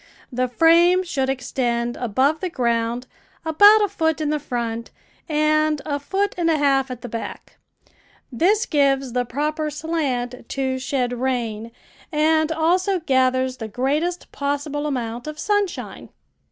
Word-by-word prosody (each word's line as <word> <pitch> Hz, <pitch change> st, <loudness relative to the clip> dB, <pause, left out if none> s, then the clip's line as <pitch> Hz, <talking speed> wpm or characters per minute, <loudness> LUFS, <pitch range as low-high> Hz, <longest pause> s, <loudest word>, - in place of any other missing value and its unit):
The 255 Hz, +1 st, 0 dB
frame 335 Hz, +7 st, +4 dB
should 270 Hz, -7 st, -1 dB
extend 240 Hz, -2 st, -1 dB
above 260 Hz, +7 st, +1 dB
the 370 Hz, -, -2 dB
ground 235 Hz, -3 st, -1 dB, 0.4 s
about 410 Hz, +7 st, +7 dB
a -, -, +2 dB
foot 320 Hz, -5 st, 0 dB
in 300 Hz, -1 st, -1 dB
the 305 Hz, -, 0 dB
front 235 Hz, -3 st, -4 dB, 0.4 s
and 305 Hz, 0 st, +2 dB
a 285 Hz, -2 st, -2 dB
foot 390 Hz, +8 st, -1 dB
and 335 Hz, -1 st, +2 dB
a 320 Hz, -, +3 dB
half 275 Hz, -2 st, +2 dB
at 250 Hz, -2 st, -7 dB
the -, -, -4 dB
back. 230 Hz, 0 st, -7 dB, 0.7 s
This 400 Hz, -, +2 dB
gives 275 Hz, -4 st, +1 dB
the 250 Hz, 0 st, 0 dB
proper 300 Hz, +5 st, -2 dB
slant 275 Hz, -6 st, -3 dB
to 265 Hz, -1 st, -1 dB
shed 255 Hz, -2 st, -1 dB
rain, 235 Hz, -3 st, -2 dB, 0.4 s
and 315 Hz, +1 st, +2 dB
also 360 Hz, +4 st, +1 dB
gathers 260 Hz, -3 st, +1 dB
the 225 Hz, -, -5 dB
greatest 290 Hz, -, -2 dB
possible 290 Hz, +1 st, -2 dB
amount 240 Hz, -2 st, -4 dB
of 305 Hz, 0 st, -6 dB
sunshine. 410 Hz, +2 st, -2 dB
280 Hz, 140 wpm, -22 LUFS, 250-320 Hz, 0.7 s, about